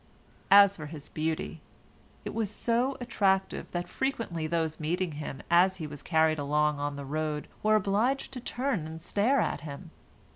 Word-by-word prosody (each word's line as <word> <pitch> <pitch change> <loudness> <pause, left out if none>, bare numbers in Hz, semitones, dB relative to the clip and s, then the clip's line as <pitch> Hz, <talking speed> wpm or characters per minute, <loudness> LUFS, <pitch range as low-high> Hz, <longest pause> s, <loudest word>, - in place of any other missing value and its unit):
As 200 0 +8
for 155 -2 -6
his 150 -2 -8
beauty, 160 0 -3 0.6
it - - -4
was 225 -3 -1
so 240 +5 0
attractive 195 -6 0
that 175 0 -3
frequently 225 -12 -2
those 160 -1 -1
meeting 175 +3 -1
him 145 -2 -6
as 185 +2 +5
he 160 - -5
was 145 -1 -7
carried 160 -2 +2
along 150 +1 +1
on 145 0 -2
the 140 -1 -6
road 150 +1 -2
were 215 0 +4
obliged 215 +8 +1
to 265 - -6
turn 245 - -2
and 160 +1 -7
stare 210 +10 +2
at - - 0
him. 155 +3 -8
170 Hz, 170 wpm, -29 LUFS, 155-210 Hz, 0.6 s, As